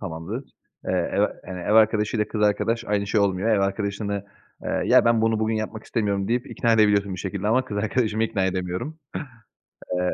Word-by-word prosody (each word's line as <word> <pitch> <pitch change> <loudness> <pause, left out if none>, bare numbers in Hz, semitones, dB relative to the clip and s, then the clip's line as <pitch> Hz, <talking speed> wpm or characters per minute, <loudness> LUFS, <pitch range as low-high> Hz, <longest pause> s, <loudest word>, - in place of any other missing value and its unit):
Tamamdır. 85 - -5 0.4
Eee, - - 0
ev - - +1
a - - +1
hani, 90 0 -6
ev 95 - -1
arkadaşıyla 110 0 +3
kız 105 -2 -2
arkadaş 115 +3 +1
aynı 100 -1 0
şey 105 - +2
olmuyor. 100 +2 +1
Ev 105 -3 +3
arkadaşını, 100 0 -2 0.4
ııı, - - -1
"Ya - - +6
ben 115 -1 +4
bunu 115 -1 +2
bugün 110 0 +1
yapmak 110 0 -4
istemiyorum." 100 -4 -1
deyip 120 +2 0
ikna 115 -2 +1
edebiliyorsun 100 -3 +3
bir 90 - -7
şekilde 100 +2 -3
ama 130 +3 +3
kız 105 - -6
arkadaşımı 110 +1 0
ikna 105 -4 -1
edemiyorum. 95 - -3 1.0
Eee 90 - 0
105 Hz, 190 wpm, -24 LUFS, 100-115 Hz, 1.0 s, Ya